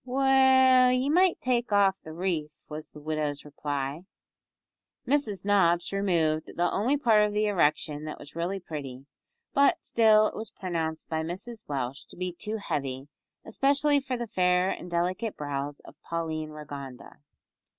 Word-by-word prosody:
"Well, 260 -1 +5
ye 255 +2 +1
might 365 +2 +4
take 245 -2 0
off 200 -1 +4
the 160 - -10
wreath," 160 -3 -3
was 155 0 -8
the 150 - -13
widow's 150 -1 -3
reply. 145 0 -4 1.0
Mrs 220 - 0
Nobbs 175 -3 +3
removed 165 -6 0
the 175 0 +1
only 250 +9 +1
part 225 -6 +4
of 210 0 0
the 210 +1 +1
erection 155 -6 +1
that 155 - -6
was 145 - -13
really 175 +4 -2
pretty, 140 -6 -7 0.5
but 280 0 +3
still 215 -2 +5
it - - -2
was 220 -1 -5
pronounced 160 -4 -4
by 160 -1 -2
Mrs 190 +8 -6
Welsh 135 -2 -4
to - - -15
be 180 0 -3
too 215 +5 -4
heavy, 135 -8 -4 0.4
especially 280 +5 +2
for 265 -2 -3
the 240 - -3
fair 180 -2 +2
and 180 - -6
delicate 180 +6 -1
brows 145 0 -4
of 145 - -16
Pauline 160 -2 -3
Rigonda. 140 -4 -9
180 Hz, 155 wpm, -28 LUFS, 155-225 Hz, 1.0 s, Well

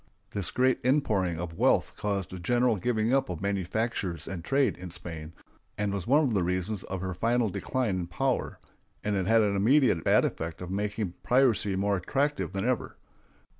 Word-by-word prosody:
This 100 -4 -3
great 130 0 +2
inpouring 110 - +1
of 85 -1 -6
wealth - - +3
caused 100 -3 -2
a 95 - -6
general 120 +5 +2
giving 110 +3 0
up 135 -6 +2
of 90 -3 -4
manufactures 100 -3 -2
and 90 -3 -5
trade 135 +6 +2
in 90 0 -7
Spain, 80 -2 -7 0.5
and 105 -1 -1
was 100 -3 -4
one 145 +5 +5
of 130 -6 +1
the 100 - +2
reasons 90 +3 -1
of 95 -2 -5
her 95 -1 -3
final 115 +4 +1
decline 110 -3 -1
in 85 - -4
power, 130 +9 -1 0.5
and 105 -1 0
it 95 -2 -1
had 115 0 +5
the 100 -1 +1
immediate 115 - +3
bad - - +4
effect 80 0 -4
of 90 0 -6
making 105 -1 -2
piracy 115 -4 +2
more 100 +1 +1
attractive 140 +11 -1
than 100 +3 -2
ever. 125 -2 -1
100 Hz, 185 wpm, -28 LUFS, 90-120 Hz, 0.5 s, one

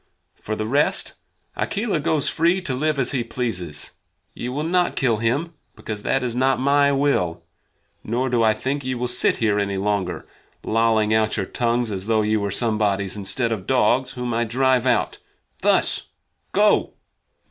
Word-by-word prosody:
For 110 - -5
the 110 - -3
rest, 140 +6 +1 0.4
Akela 205 -5 -1
goes 155 -1 0
free 170 +4 +2
to 150 -8 -3
live 150 +3 0
as 135 - +1
he 130 -4 -1
pleases. 95 - -3 0.4
Ye 120 - -5
will 145 +4 -3
not 175 +2 +1
kill 120 -5 +1
him, 130 +10 -1 0.2
because 105 -2 -6
that 135 +5 0
is 120 -2 -2
not 130 +1 +2
my 140 +1 +3
will. 90 -12 0 0.6
Nor 120 +4 -1
do 120 -2 +1
I 110 -1 +3
think 140 +2 -2
that 130 - -8
ye 130 - -1
will 125 0 -2
sit 120 - +3
here 105 -2 +1
any 100 -1 -1
longer, 95 -4 -2 0.4
lolling 110 -1 +2
out 110 0 +1
your 95 - -1
tongues 120 +1 -1
as 95 0 -4
though 110 -1 +2
ye 110 +1 +1
were 100 -1 -1
somebodies, 100 -3 0
instead 115 +4 0
of 105 -4 -4
dogs 130 0 +2
whom 125 -1 -3
I 115 +1 +1
drive 130 +1 +1
out - - +1 0.4
thus! - - +2 0.4
Go!" - - +2
120 Hz, 175 wpm, -22 LUFS, 105-135 Hz, 0.6 s, my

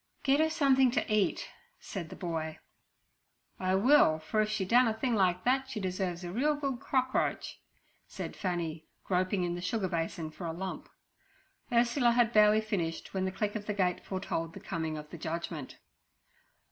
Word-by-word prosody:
'Get 275 +1 +3
her 315 0 +3
something 270 -5 +4
to 235 -3 -1
eat' 210 -2 +1 0.3
said 175 -6 -6
the - - -8
boy. 160 -3 -4 1.0
'I 185 0 +1
will, 205 - +5
for 185 +8 0
if 215 - 0
she 210 -3 -1
done 245 +5 +5
a 220 - 0
thing 245 +2 -1
like 185 -3 +2
that 265 +1 +1
she 245 - -4
deserves 185 -2 -2
a 175 - -5
real 290 +9 +1
good 275 -4 -3
crockroach' 260 -1 -1 0.5
said - - -6
Fanny, 170 -4 -3 0.2
groping 185 0 0
in 175 -1 -1
the 175 - -5
sugar 190 +2 -1
basin 165 -2 -3
for 170 +2 -6
a 165 - -3
lump. 190 +2 -6 0.8
Ursula 240 +1 +3
had 240 -1 +3
barely 215 0 +6
finished 180 -7 -3
when 190 -1 0
the 190 - -1
click 205 +3 -2
of 210 -1 -5
the 210 - -1
gate 180 -2 0
foretold 165 -3 -3
the - - -7
coming 160 -3 -3
of 150 0 -8
the 170 - -8
judgment. 160 -3 -5
190 Hz, 180 wpm, -31 LUFS, 175-235 Hz, 1.0 s, barely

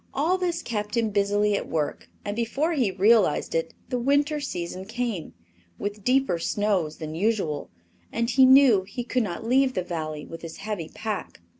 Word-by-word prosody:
All 335 +7 +2
this 350 -2 -1
kept 210 0 -3
him 225 -2 +1
busily 205 +1 +2
at - - -3
work, 150 -2 -2 0.2
and 205 - -3
before 275 +8 0
he 255 -9 +2
realized 205 +5 +3
it - - -1
the 250 - -1
winter 285 +4 +2
season 180 -7 -5
came, 225 -5 -4 0.4
with 205 0 -5
deeper 255 -8 +2
snows 190 -4 0
than 155 -1 -6
usual, 175 -5 -1 0.4
and 230 0 0
he 260 +2 +4
knew 260 -5 +7
he 205 +6 -6
could 250 +1 0
not 205 0 -4
leave 260 +2 +3
the 185 - 0
Valley 155 -3 -4
with 165 - -9
his 165 -1 -8
heavy 200 -7 -4
pack. 215 -3 -4
215 Hz, 175 wpm, -25 LUFS, 185-255 Hz, 0.4 s, knew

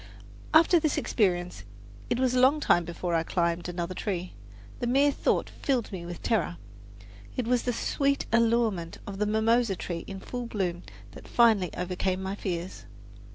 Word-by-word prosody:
After 330 +2 +6
this 310 -2 0
experience 175 - 0 0.5
it 240 - +1
was 255 -1 +1
a 255 - +2
long 270 +4 +5
time 175 - +3
before 170 +1 -4
I 165 - +3
climbed 170 +1 -1
another 175 +1 -3
tree. 185 -2 -3 0.5
The 240 - -1
mere 275 +4 +4
thought - - 0
filled 255 -5 -2
me 175 -3 -6
with 175 -1 -8
terror. 185 - 0 0.8
It 250 - 0
was 245 0 +2
the 250 - -1
sweet 280 +4 0
allurement 230 -7 +2
of 195 -1 -7
the 210 - +1
mimosa 220 0 +2
tree 170 -1 -5
in 195 -1 -6
full 245 +4 -5
bloom 180 -6 -2 0.3
that - - -12
finally 220 -7 +4
overcame 185 +1 -1
my 190 +1 -3
fears. 180 -2 -5
200 Hz, 165 wpm, -28 LUFS, 175-240 Hz, 0.8 s, After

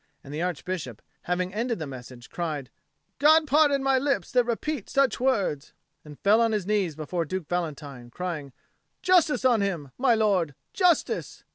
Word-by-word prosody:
And 140 - -10
the 155 - -3
Archbishop, 175 - -4 0.3
having 180 +1 -1
ended 235 +2 -1
the 160 - -4
message, 125 -2 -10
cried, 150 -7 -4 0.5
"God 310 +2 +6
pardon 290 -1 +3
my 270 -1 +3
lips 260 -9 -1
that 250 -1 +3
repeat 245 +1 -3
such 275 -3 +2
words," 200 - 0 0.3
and 150 -2 -12
fell 215 +3 +4
on 230 -1 +2
his 210 -4 -1
knees 195 -6 0
before 160 +3 -3
Duke 175 +1 -5
Valentine, 145 -8 -4
crying, 155 -1 -5 0.5
"Justice 330 -8 +3
on 240 -4 +4
him, 170 -9 -2
my 250 -3 +4
lord, 190 -9 +1 0.2
justice!" 360 -4 +1
185 Hz, 160 wpm, -26 LUFS, 155-255 Hz, 0.5 s, God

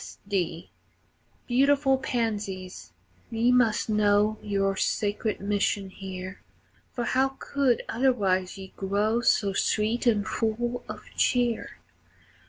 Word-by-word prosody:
S. - - -11
D. 175 -4 -2 0.7
Beautiful 270 +1 +3
pansies, 210 -7 -3 0.4
ye 235 +1 +2
must 245 -4 +3
know 210 0 +2
Your 195 -1 0
sacred 210 +2 -1
mission 200 -1 -1
here, 190 0 -7 0.5
For 240 - -3
how 265 +2 +1
could 275 -4 +1
otherwise 205 -7 +1
ye 190 -1 -10
grow 205 +4 0
So 200 -4 +2
sweet 220 +5 0
and 210 -3 +3
full 240 +3 -1
of - - -7
cheer? 245 -3 +1
215 Hz, 110 wpm, -27 LUFS, 195-240 Hz, 0.7 s, Beautiful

